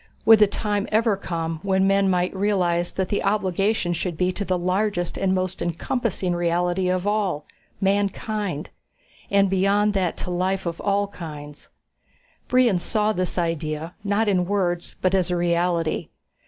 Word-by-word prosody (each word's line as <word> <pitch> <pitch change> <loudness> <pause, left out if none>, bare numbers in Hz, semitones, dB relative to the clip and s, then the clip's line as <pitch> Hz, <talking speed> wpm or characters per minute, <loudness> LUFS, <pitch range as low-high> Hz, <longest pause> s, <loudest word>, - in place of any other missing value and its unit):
Would 225 -1 +8
the 210 - +6
time 205 0 -2
ever 220 -1 +3
come 165 -4 -4
when 190 0 +2
men 195 0 +3
might 180 +1 0
realize 180 -4 +1
that 190 -1 -2
the 205 - -1
obligation 195 -1 +1
should 175 -1 -3
be 180 +1 +1
to 200 - -3
the 185 -2 0
largest 180 0 -1
and 190 -1 +1
most 185 0 -2
encompassing 185 +2 -1
reality 175 +2 0
of 185 0 0
all 200 -8 0 0.3
mankind? 200 -3 -1 0.6
And 200 0 +4
beyond 200 +2 +2
that 185 -4 0
to 180 - -4
life 185 +2 -1
of 170 -1 -4
all 200 0 +1
kinds. 150 -5 -9 0.8
Brion 245 -7 +3
saw 215 +4 0
this 185 -2 -2
idea, 165 -1 -2
not 205 +2 +1
in 185 -3 +2
words 180 -3 -1
but 185 0 +2
as 185 -2 +2
a 180 - 0
reality. 170 -1 0
185 Hz, 155 wpm, -23 LUFS, 175-200 Hz, 0.8 s, Would